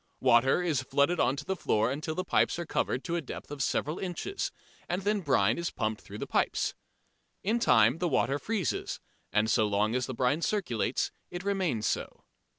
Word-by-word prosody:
Water 130 +6 +4
is 155 -7 +1
flooded 140 +6 +1
on 135 - +3
to 145 0 -6
the 190 - -1
floor 110 - +1
until 155 +3 -3
the 185 - -1
pipes 185 - +2
are 170 - -3
covered 130 - -1
to 170 - -2
a 170 - 0
depth 145 - -8
of 145 -2 -5
several 150 +5 0
inches, 190 - -3 0.4
and 180 +2 -1
then 210 +1 +1
brine 120 - +2
is 170 - -1
pumped 110 0 -2
through - - -9
the - - -4
pipes. - - 0 0.7
In 220 +5 +1
time 165 - +4
the 180 - +1
water 135 0 +1
freezes, 205 +1 -2 0.3
and 105 +1 +2
so 110 -1 +3
long 105 +2 +1
as 125 0 0
the 130 - -5
brine 130 +6 +1
circulates 170 - 0 0.2
it 175 0 -6
remains 185 - 0
so. 95 - -2
145 Hz, 195 wpm, -30 LUFS, 125-180 Hz, 0.7 s, Water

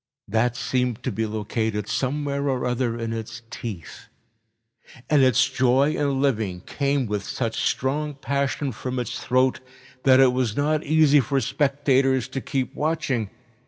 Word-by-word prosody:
That 115 +3 +1
seem 125 -2 0
to - - -1
be 110 0 -2
located 105 -1 -2
somewhere 140 +2 -1
or 130 -2 -1
other 125 -1 -1
in 115 -1 -3
its 115 +1 -6
teeth, 100 - -7 1.0
and 150 -2 +5
its 130 -2 +4
joy 135 +2 +2
in 140 -3 0
living 110 -10 0
came 140 +4 -1
with 105 -2 -2
such 115 +1 -3
strong 145 +3 -1
passion 140 0 -1
from 125 +2 -5
its 125 -3 -4
throat 130 +1 +2 0.4
that 130 0 +5
it 130 -2 +6
was 125 -4 -1
not 150 +1 +1
easy 155 -1 +5
for 135 +2 +1
spectators 135 -2 +1
to 135 - -4
keep 135 -3 -2
watching. 150 -8 -1
130 Hz, 150 wpm, -24 LUFS, 115-140 Hz, 1.0 s, it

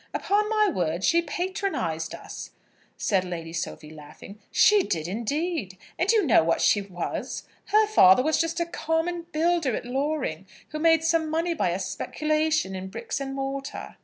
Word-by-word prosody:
"Upon 420 +1 +1
my 430 -1 +3
word, 175 - -1
she 340 +8 +4
patronised 340 - -3
us," - - -9 0.5
said 195 -5 +1
Lady 165 -3 -6
Sophie, 165 -2 -5
laughing. 155 +7 -12
"She 420 -1 +5
did, 165 - -2
indeed! 235 - -2 0.2
And 360 +5 +3
you 435 -5 +3
know 235 - +5
what 165 +1 +1
she 205 - +3
was. 185 -3 -5 0.2
Her 430 +2 +4
father 255 - +6
was 315 +3 +2
just 330 +1 -2
a 340 - +1
common 335 +1 -2
builder 325 -5 +1
at - - -5
Loring, 260 - -2 0.2
who 305 - -5
made 325 0 +4
some 325 -1 +1
money 330 +2 0
by 285 - 0
a 175 - -1
speculation 305 +6 -1
in 190 0 -5
bricks 230 +6 -5
and 270 0 -4
mortar." 275 0 -5
285 Hz, 165 wpm, -26 LUFS, -, 0.5 s, father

